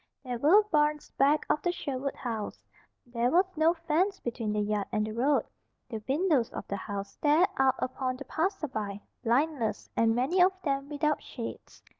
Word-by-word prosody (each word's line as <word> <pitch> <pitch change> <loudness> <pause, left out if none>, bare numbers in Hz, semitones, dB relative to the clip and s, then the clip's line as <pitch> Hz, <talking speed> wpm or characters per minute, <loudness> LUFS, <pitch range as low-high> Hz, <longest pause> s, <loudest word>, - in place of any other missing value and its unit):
There 250 -3 -4
were 360 - +6
barns 300 -1 +1
back 285 +3 +3
of 300 - +1
the 350 - +1
Sherwood 275 -5 -3
house; 225 -4 -5 0.4
there 240 0 0
was 360 +7 +4
no 320 +2 +3
fence 340 +4 0
between 230 -3 -3
the 210 - 0
yard 205 -1 -1
and 215 0 +1
the 215 - -4
road, 270 +5 +2 0.4
the 220 -3 -5
windows 290 -5 +2
of - - -6
the 200 - -2
house 200 0 -5
stared 310 +6 +3
out 265 -1 +4
upon 255 0 -2
the 280 - -8
passerby, 265 - -2 0.2
blindless, 245 -2 0
and 225 0 +3
many 275 +10 +2
of 375 +1 +4
them 275 -1 -1
without 300 0 0
shades. 235 -3 -8
275 Hz, 175 wpm, -29 LUFS, 230-310 Hz, 0.4 s, were